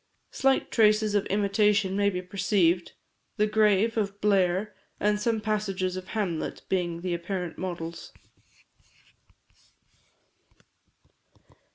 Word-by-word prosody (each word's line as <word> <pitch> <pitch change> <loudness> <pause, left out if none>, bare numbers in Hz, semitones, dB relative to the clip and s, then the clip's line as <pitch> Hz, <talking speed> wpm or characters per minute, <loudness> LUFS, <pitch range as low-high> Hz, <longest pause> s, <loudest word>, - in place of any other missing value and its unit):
Slight 270 -1 +1
traces 215 -1 +3
of 205 -1 +1
imitation 200 -1 +2
may 200 0 +2
be 180 -2 -4
perceived; 185 -2 +1 0.4
"The 210 - +3
Grave" 215 +1 +2
of 200 -2 -2
Blair, 195 0 +1 0.3
and 210 0 +1
some 225 +1 0
passages 200 -4 -2
of 185 0 -7
"Hamlet," 190 -8 -3
being 175 -3 -1
the 180 -1 -2
apparent 175 0 -4
models. 170 -2 -6
200 Hz, 100 wpm, -27 LUFS, 180-210 Hz, 0.4 s, traces